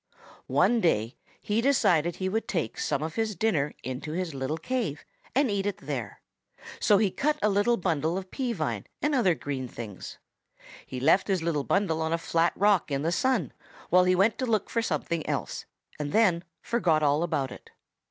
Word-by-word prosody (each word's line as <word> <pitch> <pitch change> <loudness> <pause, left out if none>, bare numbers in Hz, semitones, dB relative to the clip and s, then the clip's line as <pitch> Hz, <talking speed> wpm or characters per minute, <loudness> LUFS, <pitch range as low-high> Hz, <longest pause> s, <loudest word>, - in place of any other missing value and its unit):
One 240 -1 +3
day 115 - +1 0.3
he 215 +2 0
decided 190 - +3
he 185 - -2
would 220 +4 -1
take 165 - -2
some 140 - -1
of 160 0 -4
his 220 +1 -1
dinner 160 -7 0
into 130 +4 -5
his 180 -2 -3
little 135 +3 -2
cave 190 - -3 0.3
and 270 -4 +3
eat 200 0 0
it 205 - -2
there. 135 -7 -5 0.6
So 205 - +5
he 200 -2 +2
cut 300 +7 0
a 210 - +4
little 205 +4 +2
bundle 165 -2 0
of 190 -1 -7
pea 255 -3 -2
vine - - -3 0.2
and 295 - +2
other 205 - +3
green 135 -4 -4
things. 110 -5 -8 0.7
He 130 - -5
left 160 +9 +4
his 190 -4 0
little 155 -4 0
bundle 165 -2 +1
on 160 0 0
a - - +2
flat 165 0 +1
rock 200 -4 +3
in 140 0 -1
the 165 - +1
sun 240 - +1 0.4
while 180 +1 +6
he 185 0 +4
went 200 +5 +2
to 255 - -1
look 215 -3 0
for 230 - +1
something 170 -7 -2
else - - -3 0.3
and 145 -1 -3
then 185 -5 +3 0.2
forgot 165 -10 +1
all 145 +1 +3
about 155 -6 -1
it. - - -12
175 Hz, 190 wpm, -27 LUFS, 150-210 Hz, 0.7 s, while